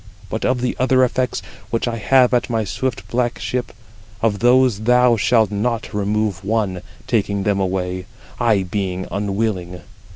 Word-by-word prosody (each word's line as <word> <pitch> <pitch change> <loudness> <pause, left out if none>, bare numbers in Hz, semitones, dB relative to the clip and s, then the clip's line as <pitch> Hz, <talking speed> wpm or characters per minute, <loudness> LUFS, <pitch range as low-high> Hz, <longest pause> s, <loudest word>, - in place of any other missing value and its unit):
But - - -2
of 125 -1 +1
the 125 - -1
other 130 0 +4
effects, 125 0 0 0.3
which 115 +1 -1
I 115 -1 -2
have 125 +3 +4
at 125 +1 +1
my 115 -2 0
swift 125 +5 -3
black 120 0 -1
ship, 125 -1 -3 0.5
of 105 -3 +1
those 125 -1 +4
thou 125 +2 +4
shalt 110 -1 +2
not 110 +2 -2
remove 105 -2 -1
one, 100 -3 -1 0.2
taking 100 -3 0
them 100 -1 +1
away, 90 -1 -2 0.3
I 110 -5 +3
being 95 -1 -3
unwilling. 100 -3 -2
110 Hz, 155 wpm, -20 LUFS, 100-125 Hz, 0.5 s, other